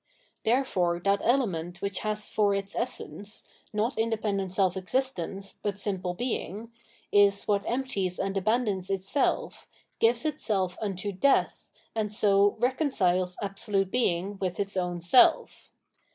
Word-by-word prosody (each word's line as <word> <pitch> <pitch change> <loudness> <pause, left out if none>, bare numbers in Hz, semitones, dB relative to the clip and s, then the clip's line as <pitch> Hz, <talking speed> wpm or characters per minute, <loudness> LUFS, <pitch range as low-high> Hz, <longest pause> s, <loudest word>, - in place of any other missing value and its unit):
Therefore 190 -9 +1
that 200 +2 +2
ele 255 +2 +3
ment 175 -2 -5
which 200 0 -3
has 215 0 -1
for 205 -2 +2
its 195 0 -3
essence, 210 -3 -3 0.3
not 220 +3 -1
independent 215 -4 -1
seK 190 -1 +1
existence, 195 -2 -2
but 205 -1 -2
simple 185 -3 -2
being, 230 -1 -3 0.4
is 200 -1 +4
what 200 -1 +2
empties 235 -8 -1
and 195 0 -2
abandons 200 -2 0
itself, 195 +8 -1 0.3
gives 235 +3 +2
itself 200 -12 0
unto 200 -1 -3
death, 235 +9 +1 0.2
and 215 -2 -2
so 200 -1 +3
reconciles 205 - +1
Absolute 195 -1 -1
Being 195 -4 0
with 180 -2 -3
its 200 0 -2
own 180 -2 -2
self. 175 +9 +4
200 Hz, 130 wpm, -28 LUFS, 185-225 Hz, 0.4 s, is